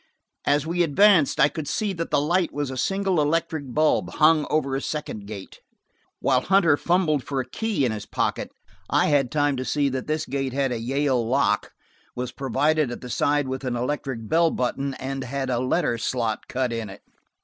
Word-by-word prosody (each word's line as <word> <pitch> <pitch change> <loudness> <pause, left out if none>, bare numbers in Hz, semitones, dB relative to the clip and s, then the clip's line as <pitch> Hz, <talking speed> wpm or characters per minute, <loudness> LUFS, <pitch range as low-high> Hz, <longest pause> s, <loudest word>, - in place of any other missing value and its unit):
As 145 +1 +2
we 175 +2 0
advanced, 175 0 +4
I 145 - +7
could 155 -1 -6
see 210 +5 -1
that 165 -2 -4
the 150 - +2
light 170 +4 +1
was 145 -2 -3
a - - -5
single 195 +4 +1
electric 150 -2 -1
bulb, 155 +4 +2
hung 155 -1 +4
over 140 -3 0
a 135 - -2
second 125 -11 -5
gate. 100 -3 -9 0.6
While 130 -2 +2
Hunter 190 -5 +4
fumbled 160 -4 +1
for 140 -2 -3
a 130 - -2
key 210 - -1
in 120 - 0
his 105 -2 -6
pocket, - - -1 0.4
I - - +3
had 140 -4 +2
time 145 -2 +1
to 130 - -2
see 140 +1 +1
that 130 -1 -4
this 155 0 -1
gate 135 -1 -3
had 135 -1 0
a 120 - -2
Yale 130 +1 0
lock, 125 -5 +1 0.4
was 125 0 -4
provided, 140 +2 +1
at 120 - -6
the 125 - -7
side, 145 +2 +1
with 130 +1 -4
an 125 -2 -2
electric 125 -2 -3
bell 165 +4 +3
button, 135 0 -2
and 135 +1 -4
had 135 +1 -3
a 120 - +1
letter 125 -2 0
slot 115 -1 -2
cut 125 -2 -1
in 115 -3 -4
it. 100 +1 -12
140 Hz, 200 wpm, -24 LUFS, 125-155 Hz, 0.6 s, I